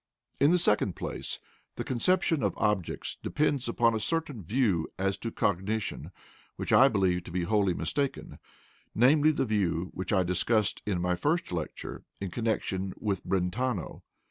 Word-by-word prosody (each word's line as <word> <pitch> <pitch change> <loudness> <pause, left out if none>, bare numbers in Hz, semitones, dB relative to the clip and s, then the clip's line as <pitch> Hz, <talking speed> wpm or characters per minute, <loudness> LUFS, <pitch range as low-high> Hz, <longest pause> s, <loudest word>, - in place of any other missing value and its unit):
In 140 - +5
the 180 - +5
second 105 - +2
place, - - -4 0.4
the - - -3
conception 165 +4 +1
of - - 0
"objects" 105 -5 -1
depends 145 -4 0
upon 115 0 +3
a 110 - 0
certain 145 - -2
view 100 -4 +1
as 95 +1 0
to 115 - -4
cognition 105 +1 -1 0.5
which - - -2
I 135 - +8
believe 95 -7 +1
to - - -8
be 90 0 -1
wholly 100 -1 +2
mistaken, 140 -1 -3 0.6
namely, 145 +6 +5
the 140 -3 +1
view 95 -5 0
which 95 -1 -4
I 95 -3 +3
discussed 95 +4 +1
in 95 -4 0
my 90 0 +1
first 155 - 0
lecture 85 -3 -5 0.2
in 100 -2 -4
connection 95 -4 -1
with 100 -4 -2
Brentano. 95 +3 -1
105 Hz, 155 wpm, -29 LUFS, 95-130 Hz, 0.6 s, I